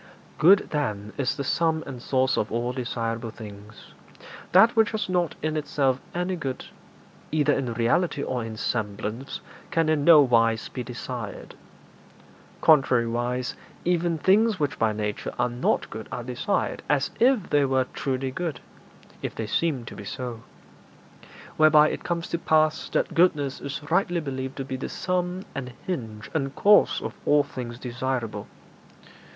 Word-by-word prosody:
Good, 190 +6 +6
then, 105 -8 -2
is 130 -3 -1
the 140 - -2
sum 160 +3 +1
and 130 -3 -7
source 130 0 +1
of 105 - -1
all 120 +2 -1
desirable 115 -2 -3
things. 105 -1 -12 0.6
That 225 +7 +6
which 225 -2 +4
has 215 -1 -1
not 180 -3 0
in 155 0 0
itself 135 -3 0
any 180 +1 -1
good, 135 -7 -4 0.7
either 150 -2 +3
in 125 -5 -2
reality 140 +6 +1
or 125 -2 -2
in 110 -1 -6
semblance, 110 +4 -3 0.3
can 165 -1 +1
in 155 -2 +2
no 165 -1 +8
wise 115 -4 +2
be 130 - -5
desired. 120 -2 -6 1.1
Contrariwise, 125 -3 +3 0.3
even 175 -1 +1
things 205 +4 +3
which 145 -2 -1
by 110 -1 +3
nature 105 -1 -3
are 120 0 +1
not 120 +2 0
good 110 0 -7
are 120 - -4
desired 125 - -1
as 145 -2 +2
if 245 -5 +3
they 145 -1 +4
were 130 -1 +2
truly 130 -1 -2
good, 165 +2 -3 0.6
if - - -4
they 110 - -3
seem 135 +2 0
to - - -9
be - - -8
so. 120 +2 -5 1.2
Whereby 155 -1 +6
it - - -5
comes 170 -1 -2
to 170 - -1
pass 155 -1 +2
that - - 0
goodness 150 -6 +2
is 140 +1 -5
rightly 175 -1 +2
believed 130 -3 -5
to 135 - -3
be 130 0 -4
the 130 - -5
sum 180 0 -2
and 125 -2 -5
hinge 115 -11 -5
and 135 -3 -2
cause 205 +1 +5
of - - -4
all 145 0 +4
things 120 -4 -7
desirable. 125 -4 -3
135 Hz, 155 wpm, -25 LUFS, 120-160 Hz, 1.2 s, no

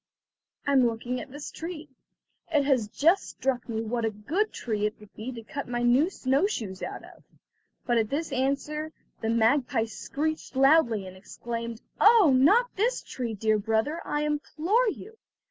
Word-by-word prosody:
"I'm 270 -3 +4
looking 240 +2 -3
at - - -10
this 290 +2 -7
tree. 325 -2 -7 0.6
It 295 -3 +3
has 255 -7 +2
just 330 - +2
struck 255 -2 -2
me 220 -1 -2
what 235 +1 -2
a 225 - +2
good 295 - -1
tree 210 -3 -1
it 210 - -8
would 210 -1 -16
be 225 +4 -6
to 230 -1 -8
cut 280 +5 -6
my 240 0 -2
new 255 +8 +4
snow 275 +1 +1
shoes 205 - -5
out - - -5
of." - - -15 0.6
But 240 -2 +2
at 215 -1 0
this 310 +2 -2
answer 280 +4 -1 0.3
the 225 - -1
magpie 230 +1 +2
screeched 295 +7 -4
loudly, 265 -7 +4
and 185 0 -10
exclaimed: 230 +4 -6 0.2
"Oh, 420 - +7
not 415 - +4
this 475 +6 0
tree, 235 -4 -4
dear 215 +1 +1
brother, 225 +10 0
I 295 - -2
implore 320 +10 +1
you! 440 +2 -9
260 Hz, 170 wpm, -27 LUFS, 225-310 Hz, 0.6 s, Oh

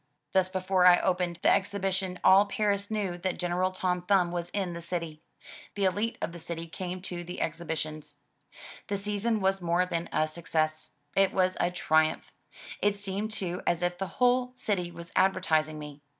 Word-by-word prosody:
Thus 185 +1 +3
before 185 -1 +3
I 175 -1 +8
opened 180 -2 0
the - - +6
exhibition, 190 -2 0
all 195 +2 +7
Paris 200 -1 0
knew 200 -5 -2
that 185 0 -2
General 180 +1 0
Tom 180 -1 -1
Thumb 180 -1 +2
was 175 0 -3
in 190 -3 -2
the 170 - -6
city. 165 -2 -4 0.5
The 200 - -1
61ite 205 +5 +1
of - - -2
the 170 - -9
city 165 0 -5
came 180 +2 -6
to 175 -2 -4
the 180 +1 -7
exhibitions. 155 -2 -3 0.7
The 200 - -1
season 210 +2 0
was 190 0 +1
more 175 +1 +2
than 170 -2 -3
a 155 - +2
success; 155 -1 -1 0.3
it 195 -1 +4
was 185 -1 +2
a 175 - +2
triumph. 160 -3 +1 0.5
It 205 0 +3
seemed 200 +1 -3
too 190 -4 -3
as 175 0 +1
if 175 0 -1
the 195 - -2
whole 250 0 +3
city 185 -7 -1
was 170 0 -10
advertising 160 -5 +2
me. 150 -1 -9
180 Hz, 180 wpm, -29 LUFS, 170-195 Hz, 0.7 s, I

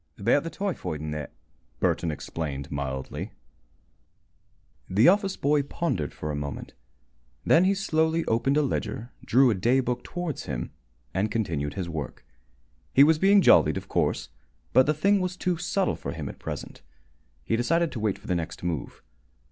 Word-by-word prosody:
"About 100 +8 +3
the 165 - -4
typhoid 185 - -3
and 75 0 -4
that," 75 -2 -5 0.5
Burton 85 - +1
explained, 75 -2 -5
mildly. 65 -2 -4 1.6
The 105 +6 +5
office 195 +1 +3
boy 145 +1 +2
pondered 140 - -2
for 75 - -5
a - - -3
moment. 70 -1 -5 0.7
Then 170 +3 +5
he 195 +1 +3
slowly 160 -3 +1
opened 135 +5 +1
a 150 - +4
ledger, 125 -3 -3
drew 130 +1 +5
a - - +3
day 120 +7 +2
book 125 -1 -2
towards 175 -5 -4
him, - - -4 0.4
and 95 +4 0
continued 80 -10 -2
his 95 -3 -3
work. 80 -6 -6 0.7
He 140 - +9
was 155 +1 +4
being 195 +1 +5
jollied, - - +6
of - - -6
course, - - 0 0.4
but 130 - +6
the 150 - +2
thing 200 +5 +3
was 180 0 -2
too 180 -2 0
subtle 180 +3 0
for - - -5
him - - -5
at - - -10
present. - - -7 0.6
He 115 - 0
decided 165 +8 +1
to 120 - -5
wait 105 -3 0
for - - -19
the - - 0
next 85 -1 -4
move. 85 -5 -4
120 Hz, 170 wpm, -26 LUFS, -, 1.6 s, He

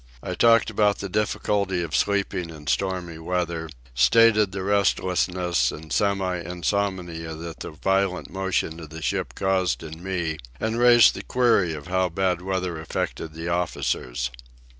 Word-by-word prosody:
I - - -3
talked 115 -1 +4
about 105 -1 +2
the 100 - -5
difficulty 100 -2 0
of 80 -2 -3
sleeping 100 -4 0
in 75 -2 -11
stormy 85 +2 -1
weather, 85 -1 -2 0.2
stated 105 - +5
the 95 -1 -4
restlessness 90 -3 +1
and 80 0 -8
semi 95 -3 +1
insomnia 90 -2 -2
that 80 0 -8
the - - -6
violent 95 +3 0
motion 95 -3 -1
of 80 -3 -9
the 80 0 -8
ship - - -2
caused 95 -3 0
in 80 +1 -9
me, 85 -5 -2 0.2
and 110 +1 -1
raised 120 -1 +7
the - - -6
query 115 -9 +2
of 75 -1 -9
how 95 +1 +1
bad 90 0 0
weather 90 -3 -2
affected 80 0 -4
the 80 +1 -4
officers. 65 -7 -1
90 Hz, 150 wpm, -24 LUFS, 80-100 Hz, 0.2 s, raised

